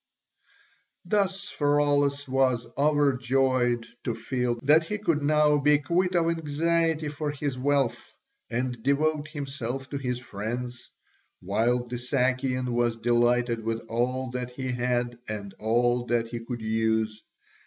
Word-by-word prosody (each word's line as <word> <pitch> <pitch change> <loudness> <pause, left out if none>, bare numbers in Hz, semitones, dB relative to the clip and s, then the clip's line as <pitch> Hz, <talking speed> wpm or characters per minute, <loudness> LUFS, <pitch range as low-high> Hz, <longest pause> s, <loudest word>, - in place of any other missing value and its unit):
Thus 200 -1 0
Pheraulas 145 -2 +1
was 130 -2 +2
overjoyed 130 -4 +2 0.2
to 120 - -2
feel 125 +1 -1
that 155 +3 +5
he 210 +5 -3
could 170 -8 0
now 150 0 +4
be 150 +1 +5
quit 175 +6 0
of 170 -1 +3
anxiety 165 0 0
for 150 +1 -3
his 145 -2 -3
wealth, 130 -2 0 0.4
and 125 0 -2
devote 150 +3 +1
himself 135 -3 -5
to 140 - -2
his 125 -2 -2
friends, 120 +1 -5 0.5
while 115 +6 +1
the 125 +1 -4
Sakian 130 0 0
was 120 -1 +1
delighted 120 0 +2
with 115 0 -2
all 125 +2 -1
that 125 -1 -4
he 130 +1 -4
had 120 -1 -1
and 100 -2 -5
all 120 +2 +1
that 115 -1 0
he 120 0 -4
could 115 0 -6
use. 110 0 0
130 Hz, 130 wpm, -27 LUFS, 120-145 Hz, 0.5 s, that